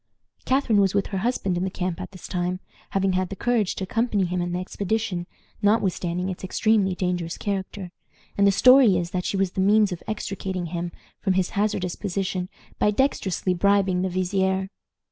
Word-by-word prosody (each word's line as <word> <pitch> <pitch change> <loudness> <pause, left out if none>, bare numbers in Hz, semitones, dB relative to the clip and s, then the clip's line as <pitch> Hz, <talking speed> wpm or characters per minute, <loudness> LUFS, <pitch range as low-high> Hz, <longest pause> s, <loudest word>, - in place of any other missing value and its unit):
Catharine 255 -6 +3
was 195 0 +2
with 200 - +2
her 190 - 0
husband 195 -5 0
in 175 - -1
the 190 - 0
camp 180 -2 -3
at - - -6
this 185 -3 -11
time, 180 0 -2 0.3
having 195 -1 +1
had 185 0 0
the 195 - -5
courage 230 -3 0
to - - -4
accompany 215 -1 0
him 180 0 -1
in 175 0 -2
the 175 - -1
expedition, 195 0 -2 0.3
notwithstanding 185 -4 +1
its 185 -1 -5
extremely 195 0 +2
dangerous 180 -2 -2
character, 195 -2 -4 0.4
and 200 0 +4
the - - +6
story 250 -2 +6
is 170 0 -3
that 180 -1 -2
she 200 - -1
was 190 -2 +1
the 190 - -1
means 205 +1 +4
of 175 - -5
extricating 190 -4 -3
him 175 0 -3 0.3
from 190 - +1
his 185 -1 0
hazardous 200 -4 -1
position 185 -2 -3 0.3
by - - +4
dextrously 205 -6 0
bribing 195 0 +2
the 190 - 0
vizier. 190 +1 0
190 Hz, 185 wpm, -24 LUFS, 180-205 Hz, 0.4 s, the